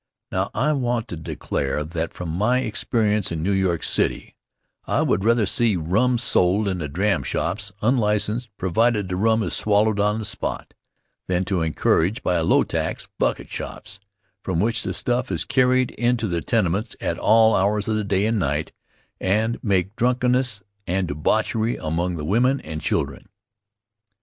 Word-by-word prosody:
Now, 95 +2 -1
I 150 - +2
want 120 -4 -1
to - - -4
declare 75 -2 -3
that 80 +1 -4
from 90 -2 -6
my 110 +10 +1
experience 105 -3 0
in 80 -1 -3
New 100 - +1
York 95 -4 0
City, - - 0 0.5
I - - +1
would 95 - +1
rather 115 0 +3
see 115 -1 +2
rum 105 +10 +1
sold 100 -3 +2
in 95 -2 -1
the 75 - -3
dram 95 +8 0
shops 100 +4 -2
unlicenced, 110 0 +1
provided 105 +3 +1
the 90 - -2
rum 110 +3 +2
is - - -3
swallowed 105 0 +2
on 105 +1 +2
the 110 - -4
spot, - - -3 0.5
than 90 0 0
to 95 -2 -1
encourage, 80 - +1
by 90 -1 +1
a 80 - 0
low - - +4
tax, - - -3
"bucket - - -1
shops" 100 0 -7 0.4
from 90 -4 -2
which 115 +4 +1
the - - -2
stuff 125 +1 0
is - - -1
carried 130 -1 +2
into 120 -2 0
the 85 -3 -1
tenements 105 +2 0
at - - -2
all 110 0 +5
hours 100 +2 +1
of 110 - 0
the 110 - 0
day 100 0 +1
and 110 0 +1
night 75 -2 -1 0.5
and 110 +5 0
make 95 -1 0
drunkenness 125 -3 +1 0.2
and 90 0 -1
debauchery 110 +10 0
among 85 +2 -2
the 75 -2 -5
women 125 - +2
and 80 0 -6
children. - - -2
105 Hz, 170 wpm, -23 LUFS, 90-115 Hz, 0.5 s, all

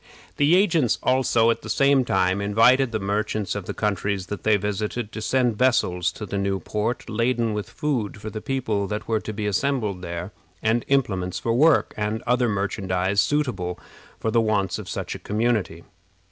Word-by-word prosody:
The 145 +4 +4
agents 165 - +3
also, 120 -3 +3
at - - -3
the 110 - -9
same 135 +4 +4
time, 95 -1 +1
invited 115 +5 +4
the 110 - 0
merchants 105 0 -1
of 100 -3 -5
the - - -3
countries 100 -2 -1
that 105 - -6
they 110 -1 +3
visited 105 +3 -3
to 110 - -6
send 120 -1 +1
vessels 90 -9 +2
to 105 - -7
the 100 0 -3
new 100 -1 0
port, 105 +5 -3
laden 115 0 0
with 105 -1 -4
food 130 -10 -2
for 110 +1 -6
the 110 - -6
people 110 -7 -1
that 105 +1 -4
were 110 -1 +1
to 110 - -6
be 105 0 -4
assembled 105 -3 -1
there, 85 +2 -5 0.3
and 115 +2 +1
implements 95 -10 0
for 115 - -1
work, 155 +7 +4
and 105 +2 -2
other 125 -1 +2
merchandise 100 -1 0
suitable 100 -9 -1 0.4
for 110 - -1
the 115 - +3
wants 100 -4 0
of - - -8
such - - -4
a - - -7
community. 105 -6 -1
110 Hz, 185 wpm, -24 LUFS, 100-120 Hz, 0.4 s, The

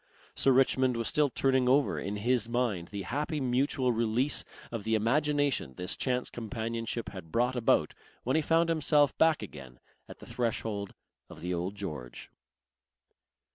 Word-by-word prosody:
Sir 135 - +3
Richmond 130 -1 +3
was 115 -2 -1
still 150 -1 +2
turning 130 -1 +2
over 140 +2 +3
in 100 +2 -4
his 120 +1 +1
mind 115 -8 -1
the 100 -1 -6
happy 150 - -2
mutual 130 0 +1
release 115 +4 +1 0.3
of 115 -3 -4
the 110 +1 +1
imagination 140 - +1
this 90 +2 -1
chance 125 -1 -1
companionship 115 0 -4
had 95 -5 -10
brought 125 +2 +1
about 120 -2 +2 0.3
when 130 - 0
he 160 - +3
found 165 +2 +2
himself 150 -3 +3
back 160 -6 +4
again 70 -10 -10 0.3
at - - -10
the - - -13
threshold 110 -4 -3 0.3
of - - -11
the 90 +2 -2
Old 90 +3 -3
George. 75 -12 -7
120 Hz, 155 wpm, -30 LUFS, 105-135 Hz, 0.3 s, back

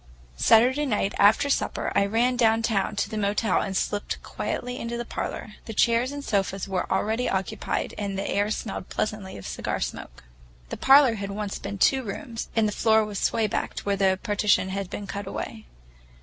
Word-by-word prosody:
Saturday 255 - +4
night 205 -4 0
after 210 +7 +5
supper 280 - -1
I 200 - +3
ran 235 +4 +2
downtown 225 -3 +2
to 200 - 0
the 215 0 -3
hotel 205 0 +1
and 190 -1 -2
slipped 205 0 -2
quietly 250 0 -4
into 235 +1 -4
the 240 - -4
parlor. 215 - -5
The 225 - -7
chairs 235 +4 +3
and 285 0 -6
sofas 195 -2 -1
were 190 -2 -2
already 220 +5 0
occupied, 190 -1 -2
and 200 -2 -3
the 195 - -2
air 205 +1 +1
smelled 215 -3 -4
pleasantly 210 -3 -3
of 95 - -10
cigar - - -3
smoke. - - -6 0.5
The - - -5
parlor 270 -2 +6
had 200 -2 -5
once 205 0 -4
been 200 0 -5
two 265 +7 +4
rooms, 230 +1 -6
and 220 -2 +3
the - - -1
floor 220 +1 +3
was 210 -2 -4
sway 225 -1 +1
backed 210 - -3
where 200 0 +1
the 190 -1 +2
partition 205 -3 +2
had 195 -1 -3
been 205 - -5
cut 200 0 -5
away. 110 - -6
210 Hz, 190 wpm, -26 LUFS, 195-230 Hz, 0.5 s, parlor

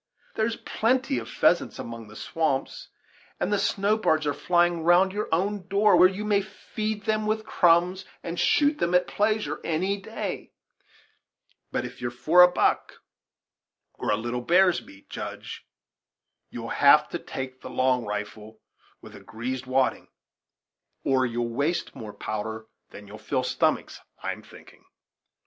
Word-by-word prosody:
There's 225 +1 0
plenty 260 +6 0
of - - -9
pheasants - - +2
among 115 -1 -7
the 105 - -14
swamps; 155 +1 -2 0.5
and 200 - 0
the 205 - +2
snow 205 +3 +1
birds 155 -6 +1
are 145 - +1
flying 175 +2 +1
round 175 +3 +4
your 210 +1 -3
own 190 +3 -1
door, 205 +1 +4
where 185 - +7
you 200 +2 -5
may 205 -1 +2
feed 215 +2 -5
them 215 0 0
with 215 0 -1
crumbs, 180 -1 +3 0.2
and 170 +1 -4
shoot 295 +1 +3
them 175 +1 +1
at 180 - +4
pleasure, 215 +1 -1
any 185 +5 0
day; - - -6 1.2
but - - -2
if - - -10
you're 120 - -1
for 155 +9 +4
a 180 0 +8
buck, - - +1 1.0
or - - -5
a 105 - +2
little 120 +2 -3
bear's 180 +6 +4
meat, 95 0 -17
Judge, - - -7 0.8
you'll - - -7
have - - +5
to - - -4
take 130 0 -7
the - - -8
long 130 -1 +1
rifle, 105 +1 -6 0.4
with - - -12
a - - -10
greased 125 +3 -5
wadding, 130 0 +1 1.0
or 130 -1 +2
you'll 120 0 -3
waste 145 +7 -1
more 110 -5 -8
powder 110 +1 -5 0.2
than 100 0 -12
you'll 105 +2 -11
fill 130 +4 -1
stomachs, 125 - 0 0.2
I'm - - -4
thinking." - - -17
170 Hz, 155 wpm, -26 LUFS, 120-200 Hz, 1.2 s, a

